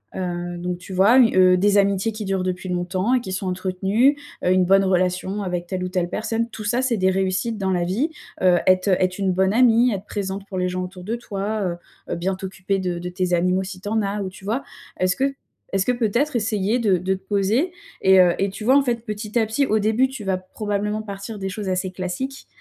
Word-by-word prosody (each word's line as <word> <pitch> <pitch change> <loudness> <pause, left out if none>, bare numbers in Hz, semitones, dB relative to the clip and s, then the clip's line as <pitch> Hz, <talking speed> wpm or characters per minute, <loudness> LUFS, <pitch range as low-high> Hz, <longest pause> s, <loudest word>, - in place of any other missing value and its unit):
heu, 175 -1 -3
donc 180 0 -3
tu 185 - -11
vois, 200 +7 +5
u 235 -3 +5
heu, 185 -1 +6
des 205 +2 +3
amitiés 200 +2 +2
qui 215 -1 -6
durent 190 -1 -1
depuis 185 0 -3
longtemps 180 +5 0
et 255 - +3
qui 190 - -6
sont 190 +1 -3
entretenues, 190 +9 +1 0.3
heu, 180 - +3
une 185 0 +4
bonne 195 +2 +5
relation 185 +1 0
avec 180 -2 -3
telle 185 0 -3
ou - - -3
telle 180 -2 -1
personne. 225 +3 -2
Tout 215 -1 -8
ça, 240 +4 +1
c'est 255 -3 0
des 190 -1 +3
réussites 190 +4 -1
dans 190 -2 -1
la 175 -2 +1
vie, 220 - 0 0.3
heu, 180 -2 +5
être 185 +1 +4
être 185 -1 +2
une 195 -1 +1
bonne 190 +2 +2
amie, 240 0 +5
être 195 0 -5
présente 195 -1 -4
pour 190 - -5
les 180 0 +1
gens 185 0 -3
autour 180 0 -8
de 225 +4 -2
toi, 210 -2 -3
heu 175 -2 -1 0.4
heu, - - -1
bien 185 +3 -1
t'occuper 190 0 -3
de 180 -2 -2
de 180 +1 -5
tes 180 0 -2
animaux 180 +2 +2
si 185 -1 -7
tu 205 - -8
en 220 +1 +1
as 200 0 -2
ou 190 - -3
tu 190 - -15
vois, 230 +7 -1 0.4
est-ce 185 0 +2
que 275 +1 0 0.4
est-ce 195 -1 +1
que - - +4
peut-être 245 +4 0
essayer 215 +1 0
de 205 -6 +3
de 185 +2 -1
te - - -10
poser 215 - +1 0.3
et 190 0 +6
heu 175 -1 +5
et 195 - +1
tu 200 +3 -8
vois, 260 +5 +5
en 280 - +4
fait, 235 -3 -1
petit 210 +1 -4
à 225 - +2
petit, 225 +6 +1
au 220 -3 +1
début, 220 +5 +2
tu 265 -5 -7
vas 190 -1 0
probablement 205 +2 -3
partir 200 +1 -7
des 195 0 -3
choses 200 +1 -5
assez 185 0 -1
classiques, 185 +10 -5
195 Hz, 245 wpm, -22 LUFS, 185-220 Hz, 0.4 s, heu